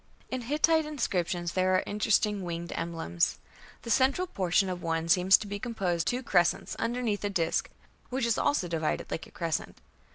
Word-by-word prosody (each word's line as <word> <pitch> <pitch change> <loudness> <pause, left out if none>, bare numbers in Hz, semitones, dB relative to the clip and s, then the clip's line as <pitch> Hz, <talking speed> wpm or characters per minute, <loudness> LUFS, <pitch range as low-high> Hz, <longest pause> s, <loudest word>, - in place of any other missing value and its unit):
In 255 -1 -2
Hittite 310 +5 +2
inscriptions 175 - -1
there 185 0 +2
are 185 - +2
interesting 210 0 +1
winged 170 -1 -4
emblems; 165 - -1 0.5
"the 230 - -4
central 270 - +3
portion" 190 - +1
of 180 -1 -4
one 165 0 -1
"seems 180 +3 +6
to - - -7
be 205 0 -5
composed 190 -8 -1
of - - +4
two 250 +2 -2
crescents 175 -7 +1
underneath 230 -4 -1
a 205 - 0
disk 170 -5 0 0.4
(which 255 -1 -1
is 235 -1 +1
also 290 -11 +1
divided 160 -2 -2
like 160 - -4
a - - -19
crescent). 165 -3 -3
195 Hz, 175 wpm, -29 LUFS, 170-235 Hz, 0.5 s, seems